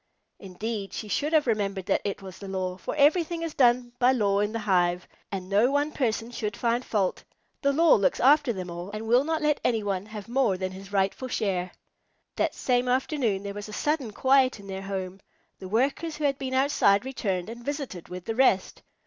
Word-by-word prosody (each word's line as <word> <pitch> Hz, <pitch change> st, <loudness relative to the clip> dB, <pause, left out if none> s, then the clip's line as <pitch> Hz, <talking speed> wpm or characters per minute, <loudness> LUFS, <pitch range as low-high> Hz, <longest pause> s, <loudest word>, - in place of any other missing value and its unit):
Indeed 200 Hz, +2 st, -5 dB
she 215 Hz, -, -5 dB
should 295 Hz, +8 st, -1 dB
have 310 Hz, -2 st, +4 dB
remembered 200 Hz, -5 st, -1 dB
that 195 Hz, -, +1 dB
it 200 Hz, -1 st, -4 dB
was 185 Hz, -1 st, -10 dB
the 200 Hz, -, -8 dB
law, 185 Hz, -1 st, -3 dB
for 185 Hz, -, -5 dB
everything 330 Hz, +3 st, +3 dB
is 330 Hz, -2 st, -4 dB
done 245 Hz, -1 st, +3 dB
by 250 Hz, +1 st, +5 dB
law 200 Hz, -6 st, +2 dB
in 205 Hz, +1 st, 0 dB
the 230 Hz, -, -3 dB
hive, 180 Hz, -4 st, +1 dB, 0.2 s
and 190 Hz, -2 st, -4 dB
no 205 Hz, +6 st, +3 dB
one 290 Hz, +2 st, +1 dB
person 235 Hz, -4 st, -1 dB
should 210 Hz, -4 st, -4 dB
find 240 Hz, +1 st, 0 dB
fault. 200 Hz, -6 st, -1 dB, 0.4 s
The 280 Hz, -1 st, +3 dB
law 325 Hz, +3 st, +5 dB
looks 200 Hz, -, +2 dB
after 280 Hz, +1 st, +5 dB
them 185 Hz, -4 st, -5 dB
all, 175 Hz, +2 st, -6 dB
and 215 Hz, +2 st, -6 dB
will 245 Hz, +4 st, +4 dB
not 320 Hz, +1 st, -1 dB
let 300 Hz, -1 st, +2 dB
any 225 Hz, -3 st, +1 dB
one 195 Hz, 0 st, -2 dB
have 210 Hz, -2 st, -8 dB
more 240 Hz, -6 st, +1 dB
than 185 Hz, 0 st, -3 dB
his 195 Hz, +1 st, -11 dB
rightful 200 Hz, +6 st, 0 dB
share. 185 Hz, -6 st, -1 dB, 0.6 s
That -, -, 0 dB
same 250 Hz, -1 st, +1 dB
afternoon 250 Hz, -6 st, 0 dB
there 200 Hz, 0 st, -5 dB
was 205 Hz, +1 st, -7 dB
a -, -, -9 dB
sudden 295 Hz, -1 st, -1 dB
quiet 260 Hz, 0 st, +3 dB
in 200 Hz, -, -12 dB
their 190 Hz, -1 st, -5 dB
home. 190 Hz, -1 st, -5 dB, 0.4 s
The 185 Hz, -, -8 dB
Workers 275 Hz, -, 0 dB
who 305 Hz, -, -5 dB
had 280 Hz, -1 st, +1 dB
been 260 Hz, -1 st, -3 dB
outside 260 Hz, -6 st, +3 dB
returned 200 Hz, -9 st, -2 dB
and 235 Hz, +2 st, -8 dB
visited 275 Hz, -, -5 dB
with 180 Hz, 0 st, -7 dB
the 225 Hz, -, -2 dB
rest. 225 Hz, -6 st, +2 dB
220 Hz, 210 wpm, -27 LUFS, 195-265 Hz, 0.6 s, by